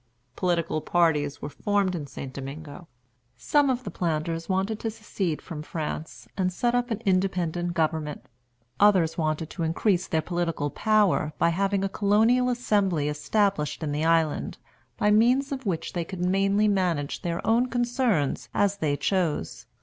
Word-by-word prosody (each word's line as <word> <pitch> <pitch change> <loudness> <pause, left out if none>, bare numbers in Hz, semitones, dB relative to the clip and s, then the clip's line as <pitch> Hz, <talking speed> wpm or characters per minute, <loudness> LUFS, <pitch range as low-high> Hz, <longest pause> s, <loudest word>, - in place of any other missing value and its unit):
Political 170 -4 0
parties 150 -5 +1
were 145 - -3
formed 200 +3 0
in 155 -5 -4
St. 135 -1 -8
Domingo. 145 +5 -8 0.5
Some 290 -2 +2
of 255 -1 -1
the - - -6
planters 165 0 -2
wanted 195 +3 0
to 225 - -2
secede 205 -7 -3
from 160 -4 -6
France, 150 -6 -5
and 185 -1 0
set 240 +6 0
up 245 0 +1
an 225 0 -3
independent 180 -3 0
government. 155 -2 -1 0.5
Others 185 -6 +4
wanted 155 0 -1
to 175 - -6
increase 175 +3 +1
their 160 -1 0
political 170 -5 -2
power 210 -8 +2
by - - +3
having 195 +3 0
a - - +2
Colonial 220 +6 +3
Assembly 200 -11 +1
established 155 +1 0
in 150 - -2
the 150 +2 -1
island, 165 -2 +1 0.4
by 210 -1 +2
means 250 +6 +3
of 265 -4 -4
which 170 -4 -2
they 175 - -1
could 180 +1 -4
mainly 195 +3 +2
manage 180 -8 0
their 170 -1 -3
own 235 +3 +3
concerns 240 - 0
as 200 0 +2
they 150 -6 0
chose. 155 - -1
180 Hz, 155 wpm, -26 LUFS, 160-210 Hz, 0.5 s, Others